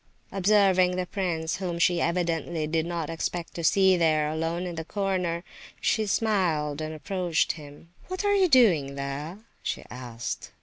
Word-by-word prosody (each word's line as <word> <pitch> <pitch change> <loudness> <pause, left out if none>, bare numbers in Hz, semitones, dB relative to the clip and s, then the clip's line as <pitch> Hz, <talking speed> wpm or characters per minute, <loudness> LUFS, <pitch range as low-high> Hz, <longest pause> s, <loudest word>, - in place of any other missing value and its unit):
Observing 190 -2 +4
the 185 0 -1
prince, 175 -4 -2
whom 180 -2 -3
she 170 0 +3
evidently 170 -2 0
did 160 +1 0
not 170 -3 -3
expect 165 +1 -3
to 170 - -5
see 190 +2 +5
there, 155 -3 +2
alone 165 +3 -2
in 175 - -4
the 165 -1 -4
corner, 180 -2 -1 0.4
she 215 -1 +1
smiled, 170 -9 +1
and 155 0 -4
approached 175 +2 0
him: 150 +1 -12 0.2
"What 370 +3 -3
are 405 - +4
you 390 -2 +4
doing 175 - +4
there?" 140 +5 -4 0.2
she - - -3
asked. 120 -2 -6
170 Hz, 160 wpm, -27 LUFS, 155-190 Hz, 0.4 s, see